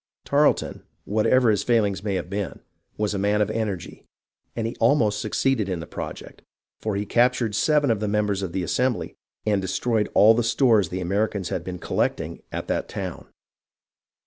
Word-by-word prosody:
Tarleton, 145 +1 +2 0.2
whatever 110 +3 +3
his 105 - +1
fail 115 -3 +3
ings 100 -1 -3
may 100 -2 -1
have 90 - -3
been, 100 0 -4 0.4
was 105 -1 0
a 100 - -2
man 105 +1 +2
of 105 0 +1
energy, 105 -6 -4 0.5
and 115 - -2
he 115 - -3
almost 115 -4 +3
succeeded 110 -1 0
in 90 -3 -2
this 80 - -8
project, - - -7 0.4
for 110 -2 -2
he 100 +1 -2
captured 120 0 +2
seven 145 +3 +3
of 110 - 0
the 105 - -2
members 105 -1 0
of 95 -3 -3
the 95 +1 -2
Assembly 125 +7 -1 0.3
and 105 -2 +2
destroyed 105 +3 0
all 110 +2 +7
the 120 - +1
stores 115 - +3
the 90 +1 -4
Americans 100 0 -1
had 85 - -3
been 90 0 -5
collecting - - -2
at - - -4
that - - -2
town. - - -6
105 Hz, 180 wpm, -24 LUFS, 100-115 Hz, 0.5 s, all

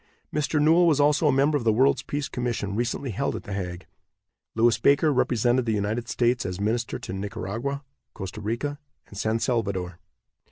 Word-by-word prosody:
Mr. 150 0 0
Newell 165 +4 +5
was 150 -3 +3
also 150 +2 +4
a - - +5
member 140 +3 +3
of - - -6
the 115 - +4
World's 130 +6 +3
Peace 145 0 -3
Commission 120 -5 -3
recently 120 +3 -2
held 140 +8 -1
at - - -6
The 105 - -6
Hague. 90 -2 -5 0.7
Lewis 115 0 +3
Baker 145 +2 +4
represented 120 -1 +2
the 110 - +2
United 110 +4 -2
States 120 0 +1
as 90 0 -4
minister 115 +3 -1
to 125 -6 -7
Nicaragua, 110 +7 -4 0.3
Costa 95 +3 -6
Rica 135 +7 -3 0.3
and - - -14
San 110 +3 0
Salvador. 100 -8 -2
120 Hz, 175 wpm, -25 LUFS, 105-140 Hz, 0.7 s, Newell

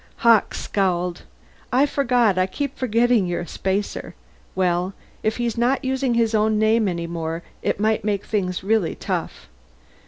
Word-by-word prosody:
Hawkes 230 -2 +4
scowled. 180 -3 -1 0.5
"I 260 +3 +4
forgot 245 -7 +2
I 185 - +2
keep 280 +7 -4
forgetting 235 -4 +2
you're 175 0 -2
a 175 - -7
spacer. 195 +2 -3 0.4
Well, 180 0 0 0.3
if 215 0 0
he's 235 -2 -2
not 250 +2 +1
using 260 -2 0
his 230 -1 +2
own 215 0 +2
name 220 0 +3
any 170 -2 -2
more 165 0 -4 0.2
it - - -1
may 215 +1 +2
make 205 -2 -1
things 185 -4 -2
really 210 -4 +1
tough. - - -4
215 Hz, 155 wpm, -22 LUFS, 185-235 Hz, 0.5 s, Hawkes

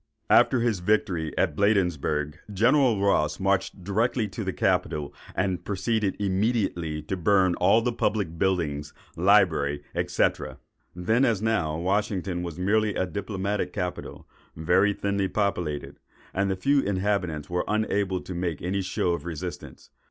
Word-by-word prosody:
After 125 - +5
his 115 -5 +1
victory 90 -4 0
at - - +1
Bladensburgh, 85 -6 +1
General 120 +2 +3
Ross 75 -7 +1
marched 95 0 0
directly 110 +4 0
to - - -5
the - - -2
capital, 75 -2 0 0.2
and 90 -2 -1
proceeded 105 +1 -1
immediately 95 -6 -1
to 95 - -3
burn 95 0 +3
all 115 - +4
the 125 0 0
public 100 -8 -1
buildings, 75 -6 -1 0.2
library, 85 -7 +3 0.2
&c. - - +3 0.7
Then, 110 +8 +1
as 110 -5 +1
now, 80 -9 0
Washington 95 0 -1
was 85 -2 -6
merely 105 +3 +1
a 95 - 0
diplomatic 100 +2 -3
capital, 90 0 -5 0.3
very 90 +6 +3
thinly 100 -1 -1
populated; 90 -8 -2 0.3
and 100 +1 0
the 95 - 0
few 140 +10 +2
inhabitants 95 - -1
were 90 0 -1
unable 100 -3 0
to 95 - -7
make 85 -3 -2
any 95 +3 -2
show 90 -1 -1
of 85 - -4
resistance. 85 +1 -7
95 Hz, 140 wpm, -26 LUFS, 85-105 Hz, 0.7 s, After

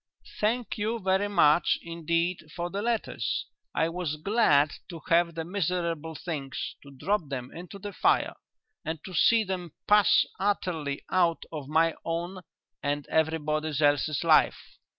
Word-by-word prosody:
"Thank 225 +2 0
you 220 +3 0
very 190 0 +1
much 175 -5 +4
indeed 170 0 -2
for 175 0 -3
the 200 - -2
letters. 225 - -1 0.3
I 160 - +2
was 170 -3 -3
glad 155 -5 +3 0.2
to 170 -3 -7
have 170 0 +3
the 165 -1 -3
miserable 170 -3 -2
things, 145 -6 -4
to 140 - -14
drop 155 +4 -1
them 130 -2 -5
into 175 +3 -9
the 205 +1 -7
fire, - - +2 0.5
and 160 +1 -3
to 185 - -8
see 225 +7 +4
them 180 -5 -5
pass 210 -1 +5
utterly 175 -8 -1
out 175 -3 +2
of 150 -4 -6
my 160 +2 +3
own 175 +3 -3 0.4
and 145 0 -1
everybody 155 -1 +1
else's 145 0 +2
life. - - +5
170 Hz, 145 wpm, -28 LUFS, 155-190 Hz, 0.5 s, pass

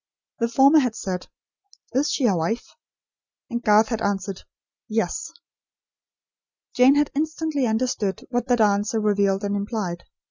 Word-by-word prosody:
The 230 - +1
former 275 +6 +6
had 250 -5 0
said: 185 -4 -4 0.6
"Is 275 +5 +1
she 270 - 0
a 205 -5 +3
wife?" 170 +8 -3 0.8
And 235 0 -2
Garth 215 -1 +4
had 225 -2 -2
answered: 195 -2 -3 0.4
"Yes." 225 - -2 1.4
Jane 255 +2 +6
had 290 0 +2
instantly 310 -2 -1
understood 220 -3 -1
what 245 0 -1
that 245 -2 +2
answer 205 +1 +2
revealed 200 -2 +1
and 205 0 -1
implied. 200 -4 -4
225 Hz, 135 wpm, -23 LUFS, 200-255 Hz, 1.4 s, former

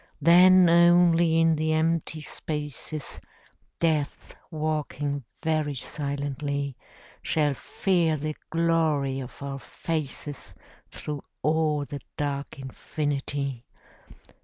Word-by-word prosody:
Then 180 +3 +7
only 170 -1 +5
in 165 0 +4
the 155 +1 +1
empty 160 0 0
spaces, 150 -1 -5 0.6
Death, 155 -3 -1 0.2
walking 150 -3 -2 0.2
very 155 -3 0
silently, 140 0 -3 0.5
Shall 150 -2 +1
fear 170 +2 0
the 155 +1 -3 0.2
glory 160 -5 +1
of 130 +1 -8
our 135 -1 -4
faces 145 -1 -5 0.3
Through 150 -2 -5 0.2
all 155 -1 +2
the 145 0 -7 0.2
dark 145 -1 -3
infinity. 140 -1 -3
150 Hz, 90 wpm, -26 LUFS, 140-165 Hz, 0.6 s, Then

